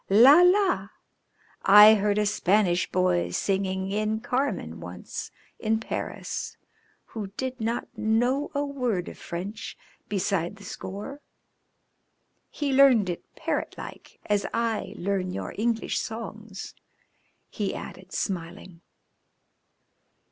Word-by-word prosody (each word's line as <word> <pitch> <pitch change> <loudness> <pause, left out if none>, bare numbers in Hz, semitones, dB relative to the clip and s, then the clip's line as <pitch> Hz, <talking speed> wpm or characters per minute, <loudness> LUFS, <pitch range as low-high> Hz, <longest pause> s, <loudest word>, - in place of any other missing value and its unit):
"La! 255 - +8
la! 360 - +4 0.7
I 210 +2 +9
heard 205 -1 +1
a 210 - +2
Spanish 190 -2 +2
boy 180 -1 +2
singing 190 -1 -1
in 215 +1 0
'Carmen' 245 - -2
once 90 +1 -7 0.3
in 220 0 +1
Paris 225 - -5 0.5
who 215 -3 -6
did 260 -2 -4
not 230 +2 -1
know 245 +6 +1
a 285 +1 +1
word 250 -10 -2
of - - -12
French 195 +6 -6 0.3
beside 195 -2 -1
the 205 - -14
score. 205 +9 -7 1.3
He 285 -3 -2
learned 255 -8 +6
it 170 - -9
parrot - - -2
like, - - -10
as 205 -1 +1
I 230 -2 -1
learn 190 0 -1
your 180 - -5
English 225 +1 0
songs," 220 -2 -7 0.8
he - - -2
added, - - -9
smiling. 170 -2 -4
210 Hz, 110 wpm, -26 LUFS, 190-235 Hz, 1.3 s, I